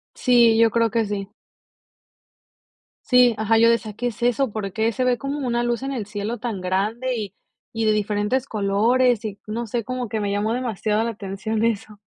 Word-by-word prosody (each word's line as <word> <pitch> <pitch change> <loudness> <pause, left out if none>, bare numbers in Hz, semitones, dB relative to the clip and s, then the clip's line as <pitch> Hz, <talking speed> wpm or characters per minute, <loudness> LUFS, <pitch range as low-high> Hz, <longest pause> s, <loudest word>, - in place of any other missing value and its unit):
Sí, 235 -3 +4
yo 230 0 +6
creo 230 0 +2
que 225 0 +1
sí. 200 -1 -4 1.8
Sí, 250 -2 +5
ajá, 220 +1 +2
yo 230 +1 +6
decía: 230 -2 0
"¿Qué 245 +4 -3
es 235 -1 -6
eso? 245 +1 +1
¿Por 200 -2 -4
qué 220 +4 0
se 255 +3 -2
ve 250 -1 +2
como 275 +2 -4
una 240 -1 0
luz 240 0 -1
en 270 - -3
el 230 -6 -3
cielo 210 +3 -4
tan 220 -5 -4
grande 215 +8 -1
y 210 -4 -5 0.4
y 225 -1 -2
de 215 - +4
diferentes 210 +4 0
colores?", 225 +3 +2
y 205 -2 -5
no 230 +3 -3
sé, 235 +2 -2
como 255 0 -4
que 220 0 -2
me 205 -1 -1
llamó 205 +2 0
demasiado 220 -3 -1
la 230 - -1
atención 210 +2 -3
eso. 215 -2 -2
225 Hz, 200 wpm, -22 LUFS, 210-240 Hz, 1.8 s, yo